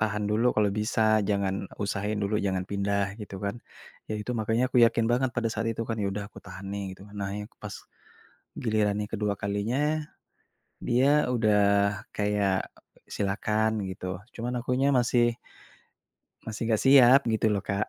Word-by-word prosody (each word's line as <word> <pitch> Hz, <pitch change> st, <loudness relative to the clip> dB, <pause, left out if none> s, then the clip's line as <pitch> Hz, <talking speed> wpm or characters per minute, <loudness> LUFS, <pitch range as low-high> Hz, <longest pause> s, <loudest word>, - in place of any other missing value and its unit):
tahan 105 Hz, -1 st, 0 dB
dulu 115 Hz, +4 st, +3 dB
kalau 105 Hz, -2 st, +3 dB
bisa 110 Hz, 0 st, +2 dB
jangan 100 Hz, -1 st, -1 dB, 0.2 s
usahain 100 Hz, +1 st, -2 dB
dulu 100 Hz, +2 st, -1 dB
jangan 95 Hz, -2 st, -1 dB
pindah 100 Hz, 0 st, -1 dB
gitu 100 Hz, -2 st, -7 dB
kan. 105 Hz, +4 st, -4 dB, 0.5 s
Ya -, -, -1 dB
itu 115 Hz, -, -5 dB
makanya 115 Hz, +3 st, +1 dB
aku 125 Hz, -, +3 dB
yakin 115 Hz, 0 st, +4 dB
banget 125 Hz, +1 st, +2 dB
pada 115 Hz, -1 st, +1 dB
saat 115 Hz, +1 st, -2 dB
itu 115 Hz, 0 st, -3 dB
kan 115 Hz, -, -2 dB
ya -, -, 0 dB
udah 105 Hz, 0 st, -4 dB
aku -, -, -13 dB
tahan 100 Hz, -, -9 dB
nih 100 Hz, 0 st, -3 dB
gitu 95 Hz, -, -15 dB
kan. 105 Hz, -, -15 dB
Nah 100 Hz, -1 st, -3 dB
yak 105 Hz, -, -7 dB
pas -, -, -6 dB, 0.8 s
giliran 105 Hz, -3 st, +1 dB
yang 105 Hz, -, -5 dB
kedua 105 Hz, -1 st, 0 dB
kalinya 100 Hz, +5 st, -1 dB, 1.1 s
dia 140 Hz, +5 st, +3 dB
udah 110 Hz, -3 st, +3 dB, 0.5 s
kayak, 105 Hz, -2 st, 0 dB, 0.4 s
silakan 110 Hz, +1 st, 0 dB
gitu. 95 Hz, 0 st, -5 dB, 0.2 s
Cuman 120 Hz, +1 st, -3 dB
akunya 130 Hz, +2 st, +1 dB
masih 120 Hz, -1 st, +2 dB, 1.1 s
masih 110 Hz, +1 st, -3 dB
gak 110 Hz, -, +2 dB
siap 135 Hz, 0 st, +7 dB
gitu 110 Hz, -1 st, +1 dB
loh, 100 Hz, -2 st, 0 dB
Kak. 100 Hz, +2 st, -1 dB
105 Hz, 165 wpm, -27 LUFS, 100-115 Hz, 1.1 s, siap